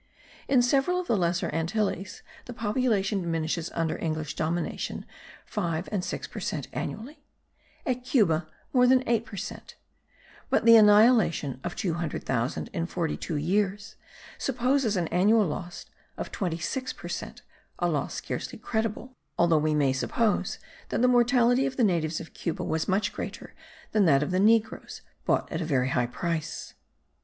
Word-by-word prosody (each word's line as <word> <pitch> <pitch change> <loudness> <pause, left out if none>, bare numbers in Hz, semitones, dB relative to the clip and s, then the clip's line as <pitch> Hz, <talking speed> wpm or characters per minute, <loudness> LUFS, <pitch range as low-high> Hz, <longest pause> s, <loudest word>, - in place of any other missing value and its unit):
In 260 -3 +4
several 275 +8 +2
of 365 - -3
the 235 - +1
Lesser 175 -2 0
Antilles 195 +3 -2 0.2
the 245 - -7
population 210 -4 0
diminishes 165 0 -2
under 165 -1 -1
English 155 -2 -2
domination 165 +2 -2 0.4
five 170 -4 -2
and 200 -4 -1
six - - -4
per - - -8
cent - - -3
annually; 290 +7 -6 0.6
at 250 -1 -1
Cuba, 175 - +2 0.3
more 250 -1 +5
than 260 0 +4
eight 230 0 +1
per - - -9
cent; 190 - -7 0.7
but - - +2
the 230 0 +9
annihilation 210 - +5
of 175 - -4
200,000 155 - -2
in 165 0 -2
forty 170 -3 -2
two 165 - -4
years 200 +6 -1 0.4
supposes 255 -3 +1
an 170 -2 0
annual 205 +5 +4
loss 175 +2 -5 0.3
of - - -5
twenty 175 -4 -2
six 260 +10 -3
per - - -9
cent, - - -6 0.3
a - - +1
loss - - -1
scarcely - - -5
credible, 225 +3 -3 0.2
although 170 -2 +4
we 155 0 +1
may 140 -3 +3
suppose 195 - 0 0.3
that - - 0
the - - +6
mortality 245 +1 +4
of 260 - -6
the 250 - +3
natives 165 -6 +1
of 165 - -10
Cuba 170 -3 -3
was 160 0 -1
much 195 +2 +1
greater - - -7 0.4
than 210 -3 +3
that 140 -3 +4
of 150 - -3
negroes 215 +4 +1 0.2
bought - - +1
at 165 - -2
a - - 0
very 130 -4 +1
high 125 -3 +1
price. 165 +4 -4
190 Hz, 160 wpm, -27 LUFS, 165-230 Hz, 0.7 s, the